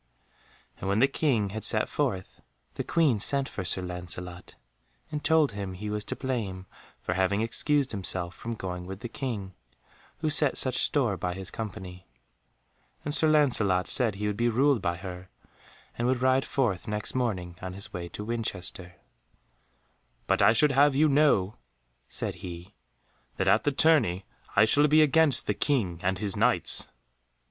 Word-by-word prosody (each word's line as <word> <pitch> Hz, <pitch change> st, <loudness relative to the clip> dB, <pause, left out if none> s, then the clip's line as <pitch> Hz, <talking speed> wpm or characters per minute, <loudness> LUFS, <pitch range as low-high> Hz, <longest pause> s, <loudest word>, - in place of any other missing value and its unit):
And 95 Hz, -, -4 dB
when 100 Hz, -, +1 dB
the 130 Hz, +5 st, +5 dB
King 125 Hz, -8 st, 0 dB
had 110 Hz, 0 st, -6 dB
set -, -, +4 dB
forth, 95 Hz, -1 st, -3 dB, 0.3 s
the -, -, -4 dB
Queen 150 Hz, -10 st, +2 dB
sent 140 Hz, +5 st, +2 dB
for 95 Hz, -, -5 dB
Sir 90 Hz, +1 st, +1 dB
Lancelot, 90 Hz, 0 st, -7 dB, 0.6 s
and 150 Hz, -1 st, -4 dB
told 155 Hz, -1 st, +3 dB
him 100 Hz, -2 st, -5 dB
he 105 Hz, +3 st, -5 dB
was 105 Hz, 0 st, -2 dB
to -, -, -4 dB
blame 105 Hz, -8 st, -4 dB, 0.3 s
for -, -, -3 dB
having 95 Hz, +3 st, +1 dB
excused 140 Hz, +4 st, 0 dB
himself 95 Hz, -3 st, -2 dB
from 115 Hz, +5 st, -6 dB
going 90 Hz, -3 st, -6 dB
with 95 Hz, +2 st, -8 dB
the 120 Hz, -, -4 dB
King, 115 Hz, -6 st, -5 dB, 0.6 s
who 155 Hz, -1 st, -1 dB
set 150 Hz, -1 st, +3 dB
such 130 Hz, -2 st, -1 dB
store 120 Hz, -10 st, +1 dB
by 90 Hz, -1 st, -3 dB
his 95 Hz, 0 st, -8 dB
company; 95 Hz, -4 st, -7 dB, 1.0 s
and 145 Hz, -, -2 dB
Sir 155 Hz, +1 st, +4 dB
Lancelot 115 Hz, -12 st, +3 dB
said 115 Hz, -6 st, +1 dB
he 105 Hz, +1 st, -4 dB
would 105 Hz, -1 st, -2 dB
be 120 Hz, +1 st, +2 dB
ruled 130 Hz, +1 st, +2 dB
by 85 Hz, -1 st, -1 dB
her, 90 Hz, 0 st, -9 dB, 0.7 s
and 120 Hz, -, -1 dB
would 130 Hz, 0 st, 0 dB
ride 130 Hz, +1 st, +3 dB
forth 115 Hz, -10 st, -1 dB
next 105 Hz, 0 st, -3 dB
morning 95 Hz, -9 st, -2 dB
on 95 Hz, 0 st, -6 dB
his 100 Hz, +3 st, -7 dB
way 85 Hz, -1 st, -5 dB
to 105 Hz, -, -7 dB
Winchester; 95 Hz, -6 st, -4 dB, 1.3 s
"but -, -, +1 dB
I -, -, +6 dB
should 145 Hz, +6 st, +4 dB
have 140 Hz, +1 st, +4 dB
you 155 Hz, +3 st, +4 dB
know," 135 Hz, -9 st, +2 dB, 0.5 s
said -, -, -4 dB
he, 90 Hz, +2 st, -9 dB, 0.6 s
"that -, -, -1 dB
at -, -, +3 dB
the 145 Hz, -, +3 dB
tourney 135 Hz, -, +2 dB, 0.3 s
I 100 Hz, -, +6 dB
shall 145 Hz, +7 st, +3 dB
be 155 Hz, +1 st, +5 dB
against 150 Hz, -3 st, +4 dB
the -, -, 0 dB
King 100 Hz, -, 0 dB
and 95 Hz, +1 st, 0 dB
his 100 Hz, -1 st, -1 dB
Knights." -, -, +3 dB
105 Hz, 170 wpm, -27 LUFS, 95-135 Hz, 1.3 s, I